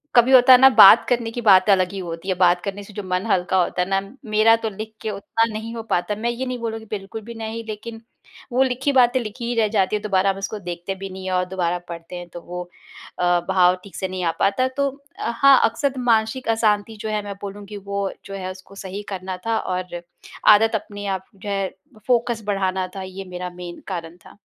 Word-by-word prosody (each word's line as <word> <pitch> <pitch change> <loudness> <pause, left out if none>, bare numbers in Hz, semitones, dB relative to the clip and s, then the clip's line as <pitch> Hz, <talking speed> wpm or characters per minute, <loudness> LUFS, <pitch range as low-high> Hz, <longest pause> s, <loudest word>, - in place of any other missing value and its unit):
कभी 245 +2 +6
होता 255 0 +8
है 250 - +8
ना 265 +1 +9
बात 195 - +10
करने 235 -2 0
की 240 - -5
बात 195 -3 +5
अलग 185 -2 +3
ही 195 - -4
होती 170 +1 -6
है, 185 - +1
बात 175 -1 +3
करने 200 0 -4
से 205 - -14
जो 205 - -5
मन 185 +1 -2
हल्का 185 +1 +1
होता 180 - -2
है 180 - 0
ना 195 0 +2 0.3
मेरा 215 +2 +5
तो 225 -1 -3
लिख 215 +2 -8
के 220 - -3
उतना 215 +3 0
नहीं 225 +2 -5
हो 225 - -5
पाता 190 +4 0
मैं 225 +3 -2
ये 240 +2 -3
नहीं 250 -1 -3
बोलूँगी 225 -1 -4
बिल्कुल 200 +1 -6
भी 235 +2 -9
नहीं 225 0 -5
लेकिन 225 +1 -7 0.5
वो 255 +2 +3
लिखी 260 +2 0
बातें 255 -1 +4
लिखी 235 +1 -6
ही 240 - -1
रह 220 - +3
जाती 205 -1 +1
है 210 - -2
दोबारा 195 -2 +1
हम 195 - -1
उसको 195 +2 -4
देखते 175 +1 -5
भी 195 0 -7
नहीं 190 0 -8
हैं 185 - -2
और 180 0 +1
दोबारा 180 -2 -1
पढ़ते 170 +1 -8
हैं 175 0 -7
तो 175 - -7
वो 180 +1 -6 0.6
अ, 175 0 +3
भाव 180 -1 +4
ठीक 200 - -13
से 190 - -2
नहीं 185 -1 -4
आ 165 - +2
पाता। 255 +6 +2
तो 280 0 +2 0.3
हाँ, 270 - +5
अक्सर 260 +4 +1
मानसिक 230 +1 +1
अशांति 220 -1 +1
जो 220 - -4
है 215 -1 -1
मैं 200 -1 -6
बोलूँगी 205 +1 -7
वो 200 0 -3 0.2
जो 195 - -8
है 185 -1 -4
उसको 190 +1 -14
सही 195 +1 -7
करना 185 -1 -5
था 225 0 +1
और 180 -1 -4 0.6
आदत 225 +2 +2
अपने 205 -1 -5
आप 190 - -19
जो 195 +1 -8
है 195 -1 0 0.4
फ़ोकस 235 -2 +1
बढ़ाना 190 -2 0
था, 195 - -5
ये 190 +1 -8
मेरा 180 0 -6
मेन 175 -1 -9
कारण 170 -3 -6
था। - - -16
200 Hz, 230 wpm, -22 LUFS, 185-225 Hz, 0.6 s, बात